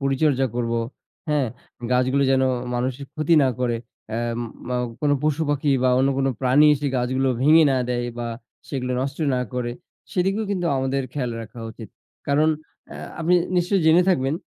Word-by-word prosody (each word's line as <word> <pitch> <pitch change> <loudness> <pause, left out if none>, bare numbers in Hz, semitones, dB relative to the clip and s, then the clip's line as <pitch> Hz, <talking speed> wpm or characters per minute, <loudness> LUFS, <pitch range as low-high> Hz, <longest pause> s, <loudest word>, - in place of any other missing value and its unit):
পরিচর্যা 135 0 +2
করবো, 115 -1 0 0.5
হ্যাঁ? 150 -3 +2 0.5
গাছগুলো 130 +2 +2
যেন 130 0 +3 0.3
মানুষের 130 +3 -2
ক্ষতি 155 +2 +2
না 135 - +3
করে। 120 -2 +1 0.3
অ্যা 110 - -2 0.5
মাও 125 0 0 0.2
কোনো 145 -1 +2
পশু 155 +1 +1
পাখি 145 0 0
বা 130 - +4
অন্য 135 +1 +3
কোন 135 - +1
প্রাণী 135 +4 +5
এসে 145 0 -3
গাছগুলো 130 +2 0
ভেঙে 155 +3 +7
না - - +1
দেয় 120 -1 -1
বা 120 - -3 0.4
সেগুলো 125 -3 -3
নষ্ট 135 +2 -3 0.2
না 125 - 0
করে। 125 -1 -2 0.4
সেদিকেও 195 +4 0
কিন্তু 180 -3 -1
আমাদের 135 +1 0
খেয়াল 125 -4 -2
রাখা 110 +2 -12
উচিত। 110 0 -10 0.4
কারণ, 150 +2 +3 0.4
অ্যা - - -9 0.2
আপনি 170 +2 +3 0.2
নিশ্চয়ই 180 +1 +2
জেনে 165 +3 +6
থাকবেন, 135 -6 +2
135 Hz, 165 wpm, -23 LUFS, 125-150 Hz, 0.5 s, ভেঙে